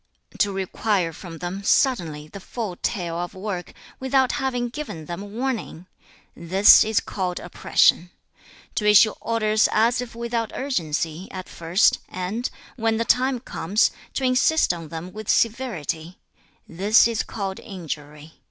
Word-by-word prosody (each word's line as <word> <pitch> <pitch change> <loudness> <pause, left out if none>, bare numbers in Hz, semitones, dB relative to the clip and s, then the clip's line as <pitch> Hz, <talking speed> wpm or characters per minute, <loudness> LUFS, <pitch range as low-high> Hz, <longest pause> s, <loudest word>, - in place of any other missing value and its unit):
To 205 - +3
require 190 -2 -1
from 165 0 -9
them, 180 +4 -5
suddenly, 170 - +1
the 200 - -10
full 205 -1 -5
tale 170 -3 -2
of 175 +2 -5
work, 190 -2 -5 0.3
without 265 -1 +2
having 250 -3 -1
given 235 - -7
them 195 +5 -7
warning; 240 -8 -3 0.5
this 185 +4 +6
is 220 0 +1
called 180 -2 -3
oppression. 175 0 +2 0.6
To 210 - -1
issue 210 +1 +7
orders 215 -1 +2
as 230 +3 +3
if 240 -2 -8
without 235 -1 -2
urgency, 165 - -2
at 185 -1 -7
first, 170 +4 +2
and, 195 +7 -3 0.3
when 225 -1 +1
the 230 - -1
time 255 0 +2
comes, 205 -1 +1 0.2
to 270 - -1
insist 260 - +3
on 165 -2 -7
them 165 +3 -7
with 215 0 -8
severity; 185 - -1 0.5
this 200 +7 +4
is 230 -2 -1
called 195 -3 -5
injury. 155 -5 -8
200 Hz, 140 wpm, -23 LUFS, 175-235 Hz, 0.6 s, issue